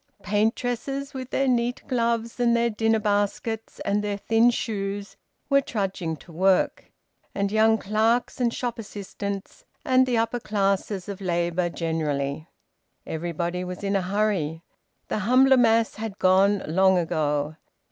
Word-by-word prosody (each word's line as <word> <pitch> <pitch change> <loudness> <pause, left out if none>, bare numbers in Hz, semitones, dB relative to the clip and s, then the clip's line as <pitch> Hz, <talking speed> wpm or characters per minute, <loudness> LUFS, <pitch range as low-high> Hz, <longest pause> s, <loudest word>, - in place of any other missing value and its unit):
Paintresses 245 +7 -1
with 260 -1 -6
their 270 0 0
neat 245 -1 0
gloves 235 -2 -1
and 235 -1 +3
their 235 0 +1
dinner 225 +1 +2
baskets 210 +2 -1
and 205 +1 0
their 205 -1 -2
thin 225 +3 +3
shoes 200 -3 -3 0.3
were 275 -1 +4
trudging 195 - -3
to 170 - -16
work, 185 +3 +1 0.4
and 200 0 0
young 220 +1 +4
clerks 220 +5 0
and 240 -1 +2
shop 240 -1 -3
assistants 200 -1 -6 0.2
and 260 0 +4
the 245 -2 +1
upper 230 +2 0
classes 200 -3 -1
of 200 -1 -6
labour 175 -1 0
generally. 155 -3 -2 0.6
Everybody 170 +2 -3
was 180 +2 -6
in 200 0 0
a 195 - +2
hurry. 185 -5 -1 0.4
The - - -2
humbler 255 +6 +5
mass 230 -2 +3
had 215 -2 -5
gone 190 +2 +3
long 190 +3 +3
ago. 155 -3 -1
205 Hz, 140 wpm, -25 LUFS, 185-230 Hz, 0.6 s, humbler